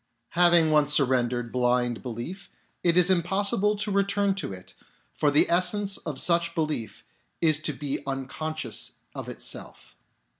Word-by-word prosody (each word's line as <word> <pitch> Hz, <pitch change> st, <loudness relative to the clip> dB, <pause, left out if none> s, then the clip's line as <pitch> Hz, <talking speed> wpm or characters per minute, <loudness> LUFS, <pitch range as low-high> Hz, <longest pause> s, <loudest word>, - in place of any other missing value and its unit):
Having 170 Hz, -2 st, +4 dB
once 150 Hz, -1 st, +3 dB
surrendered 125 Hz, -4 st, +1 dB
blind 125 Hz, -1 st, 0 dB
belief, 125 Hz, -, -7 dB, 0.3 s
it 170 Hz, 0 st, +3 dB
is 180 Hz, +1 st, +6 dB
im 180 Hz, -2 st, +3 dB
possible 200 Hz, +4 st, +1 dB
to 210 Hz, 0 st, -2 dB
return 200 Hz, 0 st, +1 dB
to 190 Hz, -, -3 dB
it, 95 Hz, -1 st, -10 dB, 0.4 s
for 150 Hz, -, +1 dB
the 145 Hz, +1 st, +4 dB
essence 195 Hz, +3 st, +2 dB
of 150 Hz, -5 st, -5 dB
such 170 Hz, -1 st, +2 dB
belief 155 Hz, -8 st, -3 dB, 0.4 s
is 155 Hz, -3 st, +3 dB
to 155 Hz, -1 st, -1 dB
be 140 Hz, 0 st, -4 dB
unconscious 135 Hz, -1 st, -4 dB, 0.2 s
of -, -, -7 dB
itself. -, -, -6 dB
155 Hz, 145 wpm, -26 LUFS, 130-185 Hz, 0.4 s, is